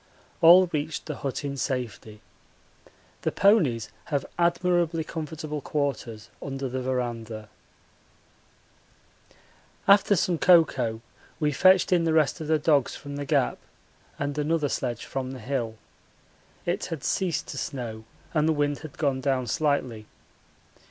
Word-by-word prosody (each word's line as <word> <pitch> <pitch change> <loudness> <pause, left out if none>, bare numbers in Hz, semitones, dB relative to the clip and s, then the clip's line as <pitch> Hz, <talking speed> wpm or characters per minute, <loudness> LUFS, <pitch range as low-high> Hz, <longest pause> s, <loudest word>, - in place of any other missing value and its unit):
All 175 +3 +9
reached 155 +1 -2
the 150 - -5
hut 140 +1 -4
in 140 -1 -3
safety. 115 -5 -4 1.0
The - - 0
ponies 165 - +3
have 145 -2 -1
admirably 170 -1 +2
comfortable 155 -2 -5
quarters 130 -7 -3
under 135 -1 -4
the 130 +1 -3
verandah. 115 -4 -3 2.4
After 200 0 +6
some 175 -2 0
cocoa 135 -10 +4 0.4
we 150 -2 +1
fetched 185 +7 +5
in 175 -2 +4
the 160 - +2
rest 160 +1 +2
of 155 - -5
the 160 0 +3
dogs 145 -3 +2
from 140 -1 -8
the 145 0 -4
Gap 140 -3 +1 0.6
and 145 0 -2
another 150 -1 +1
sledge 120 -4 -3
from 130 -1 -4
the 130 - -8
hill. 120 -2 -3 0.9
It - - -1
had 160 -5 -6
ceased 185 -4 0
to - - -5
snow 115 -5 -5 0.3
and 155 -1 +2
the - - +3
wind 145 -1 0
had 155 -3 -10
gone 140 -3 0
down 130 -2 0
slightly. 125 -6 -1
145 Hz, 135 wpm, -26 LUFS, 125-160 Hz, 2.4 s, All